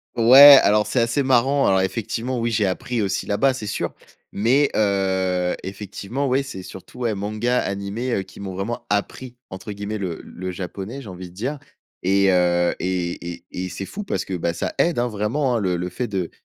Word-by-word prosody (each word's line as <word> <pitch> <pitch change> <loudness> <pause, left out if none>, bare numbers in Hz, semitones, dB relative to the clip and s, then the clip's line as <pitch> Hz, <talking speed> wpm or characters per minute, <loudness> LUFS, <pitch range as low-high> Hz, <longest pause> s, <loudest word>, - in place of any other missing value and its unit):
Ouais, 135 +4 +10
alors 105 0 +3
c'est 115 +4 0
assez 115 +4 +1
marrant 135 +2 +3
alors 95 -1 +3
effectivement 115 +6 -2
oui, 115 0 0
j'ai 105 -2 +1
appris 110 +5 -2
aussi 95 0 -2
là-bas, 130 +6 +2
c'est 110 -5 -6
sûr. - - -3 0.4
Mais 130 +8 +2
heu, 95 -3 +1
effectivement 105 +7 -4
ouais, 130 +2 +2
c'est 115 -9 -8
surtout 95 +7 -12
ouais, 115 -3 0
mangas, 110 +5 -1
animés, 100 +6 -3
heu, 95 - -1
qui - - -15
m'ont 95 -2 -6
vraiment 115 +5 -4
«appris» 120 +5 -2 0.2
entre 100 +3 -7
guillemets 100 +1 -4
le 90 -4 -4
le 95 0 -7
japonais, 95 +8 -6
j'ai 105 - -10
envie 90 -1 -8
de 85 - -19
dire 135 +9 -3 0.4
et 95 +1 +3
heu, 90 -1 +2
et 85 -1 -3
et 85 0 -13
et 90 0 -4
c'est 100 - -6
fou 210 - -6
parce 95 - -3
que 95 - -6
bah, 85 -1 -1
ça - - -3
aide, 170 -1 +2
hein, 120 - +1
vraiment 120 +5 -1
hein. - - +1
Le 90 -3 0
le 90 +1 -3
fait 120 +7 -4
de 95 -5 -3
100 Hz, 205 wpm, -22 LUFS, 95-120 Hz, 0.4 s, Ouais